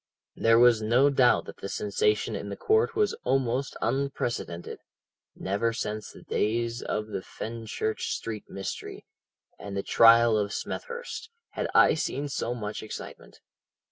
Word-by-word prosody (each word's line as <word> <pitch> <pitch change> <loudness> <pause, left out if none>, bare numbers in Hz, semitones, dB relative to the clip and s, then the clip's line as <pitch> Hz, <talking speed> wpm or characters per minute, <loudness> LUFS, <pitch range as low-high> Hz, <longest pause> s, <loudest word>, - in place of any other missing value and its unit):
"' - - -65
"There 115 0 +7
was 120 -2 +6
no 125 +6 +4
doubt 125 -3 +4
that - - -10
the 100 - -6
sensation 425 - 0
in - - -5
court 445 -3 +2
was 425 +1 +2
almost 135 0 0
unprecedented. 120 -8 -2 0.6
Never 100 +5 -1
since 110 -2 -4
the - - -14
days 115 +2 -1
of 105 - -2
the 105 - -3
Fenchurch 110 +1 -4
Street 110 -2 -5
mystery, 95 0 -6 0.5
and 100 -1 -6
the 100 - -1
trial 115 -1 +6
of 100 0 -2
Smethurst, 480 -1 -5 0.2
had - - -3
I - - +7
seen 145 -2 -2
so 120 -3 -2
much 105 -3 -5
excitement. 110 - -9
115 Hz, 140 wpm, -27 LUFS, 110-135 Hz, 0.6 s, There